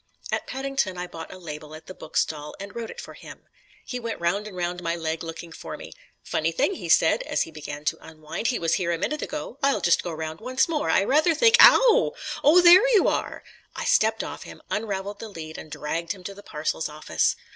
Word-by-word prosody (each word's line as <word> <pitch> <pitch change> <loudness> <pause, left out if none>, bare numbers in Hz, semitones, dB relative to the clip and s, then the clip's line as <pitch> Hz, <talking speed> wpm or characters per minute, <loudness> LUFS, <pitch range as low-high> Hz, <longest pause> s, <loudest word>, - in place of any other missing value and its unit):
At - - -2
Paddington 265 -8 -2
I 180 - -3
bought 165 -2 -9
a - - -9
label 155 -3 -8
at 160 0 -12
the 185 - -9
book 160 - -7
stall 150 -1 -1
and 200 +1 -8
wrote 230 -1 -5
it - - -9
for - - -9
him. - - -12 0.4
He 250 - -4
went 230 -1 -5
round 190 +5 0
and 190 -3 -10
round 175 0 -2
my 170 -1 -1
leg 160 -1 -3
looking 165 +1 -8
for - - -8
me. - - -10 0.3
"Funny - - -1
thing," 450 -5 +1
he - - -7
said, - - +4
as - - 0
he 165 - -10
began 150 -1 -8
to - - 0
unwind, 155 +7 -5
"he 250 - +1
was 165 0 0
here 170 0 0
a 170 - 0
moment 300 - -2
ago. 295 -3 -6
I'll 275 0 +2
just 175 - +3
go 175 - -5
round 160 0 -5
once 255 +2 +1
more. 305 - -1
I 190 - +4
rather 310 - +3
think.... 465 +7 +6
Ow! 480 -1 +7 0.3
Oh, 325 +5 +7
there 360 +7 +8
you 400 - +5
are!" - - -3 0.3
I - - -4
stepped - - +3
off - - -7
him, - - -11
unravelled 200 -1 -3
the 225 - -7
lead 160 -5 -8
and 155 - -10
dragged 150 +4 -3
him 190 -2 -14
to 200 - -6
the 200 - -13
Parcels 155 -2 -3
Office. 150 +1 0
185 Hz, 230 wpm, -25 LUFS, 160-260 Hz, 0.4 s, there